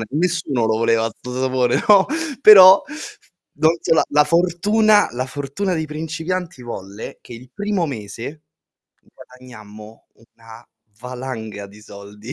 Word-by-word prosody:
sapone, - - -4
nessuno 155 -7 -1
lo 110 0 0
voleva 115 0 +1
'sto 125 - -10
sapone, 130 -1 0
no, 200 -2 +6 0.4
però 190 -2 +9 0.7
non 155 +2 +2
so, - - +1
la - - +2
la 150 0 +3
fortuna 200 +7 +2
la 125 +1 -3
fortuna 145 +8 -4
dei 160 -2 -3
principianti 160 +1 -5
volle 100 -3 -9
che - - -13
il 125 +2 -13
primo 205 -4 -2
mese, 120 +4 -8 0.6
guadagnammo 110 -4 -15 0.3
una 115 +1 -15 0.3
valanga 125 -5 -7
di 100 +2 -17
soldi, 105 +4 -12
130 Hz, 130 wpm, -19 LUFS, 115-170 Hz, 0.7 s, però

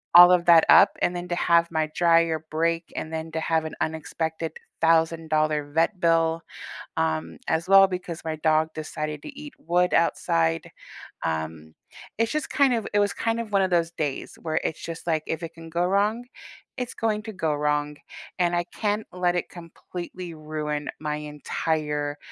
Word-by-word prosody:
all 175 +1 +11
of 175 -1 +3
that 170 -2 +7
up 200 - +8
and 175 - +1
then 175 0 -5
to 175 - -2
have 170 -1 +3
my 160 -1 0
dryer 165 -2 +3
break, 165 +1 0
and 160 +1 -5
then 160 0 -4
to 160 - -1
have 160 0 0
an 155 - -6
unexpected 160 +1 -3 0.3
$1,000 160 -2 +2
vet 165 +5 +1
bill, 165 -1 +2 0.6
um, 80 0 -1
as 165 +2 0
well 195 0 +8
because 180 -2 -5
my 160 -1 -2
dog 155 0 +2
decided 155 -1 -5
to - - -7
eat 295 -2 -9
wood 180 +2 +1
outside, 80 - +1 0.5
um, 80 0 -4 0.4
it's 230 +1 +1
just 305 - -2
kind 275 -3 +3
of 225 -3 -1
it 205 - +3
was 205 0 +2
kind 230 0 -1
of 225 -2 -5
one 195 - +4
of 190 - +1
those 170 -1 +2
days 150 -5 -4
where 155 -2 -1
it's 160 - -3
just 165 +1 -7
like, 155 -2 +1
if 160 +1 -3
it 165 - -6
can 165 0 -11
go 170 +2 0
wrong, 205 +5 +1 0.5
it's 250 -1 -4
going 215 -1 -1
to 220 - -6
go 160 -4 -1
wrong, 150 0 0 0.4
and 175 -1 +2
I 175 - +1
can't 210 0 -1
let 180 -1 +1
it - - -2
completely 175 0 -8
ruin 150 -1 -4
my 150 -1 -2
entire 150 0 -2
165 Hz, 180 wpm, -25 LUFS, 155-180 Hz, 0.6 s, all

